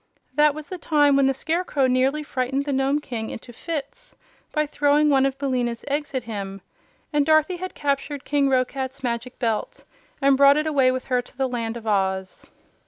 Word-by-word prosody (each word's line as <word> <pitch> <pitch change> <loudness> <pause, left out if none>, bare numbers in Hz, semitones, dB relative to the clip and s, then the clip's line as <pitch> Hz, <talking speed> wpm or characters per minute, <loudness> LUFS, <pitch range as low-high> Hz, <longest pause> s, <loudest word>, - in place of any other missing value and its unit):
That 295 +1 +4
was 310 -1 -7
the 365 +3 -7
time 290 -3 +3
when 275 -1 +4
the 270 - +2
Scarecrow 315 -1 0
nearly 260 +4 +2
frightened 270 0 -2
the 285 - -1
Nome 270 +2 +1
King 230 -6 -5
into 240 +1 -9
fits 330 - -6 0.4
by 305 0 +1
throwing 295 0 +2
one 270 -1 +4
of 270 0 -4
Billina's 250 -4 -2
eggs 290 0 -2
at 255 - -1
him, 195 -4 -6 0.5
and 295 -1 +3
Dorothy 310 +4 +3
had 370 +1 -6
captured 280 0 -2
King 285 -2 +2
Roquat's 260 +1 -1
Magic 240 +1 -3
Belt 225 -4 -2 0.4
and 275 0 +4
brought 280 +1 +6
it 305 - 0
away 280 -4 +3
with 255 0 -3
her 250 -1 +1
to 245 - -19
the 265 -1 +1
Land 235 -2 -3
of 225 - -11
Oz. 190 -2 -1
275 Hz, 190 wpm, -23 LUFS, 250-295 Hz, 0.5 s, brought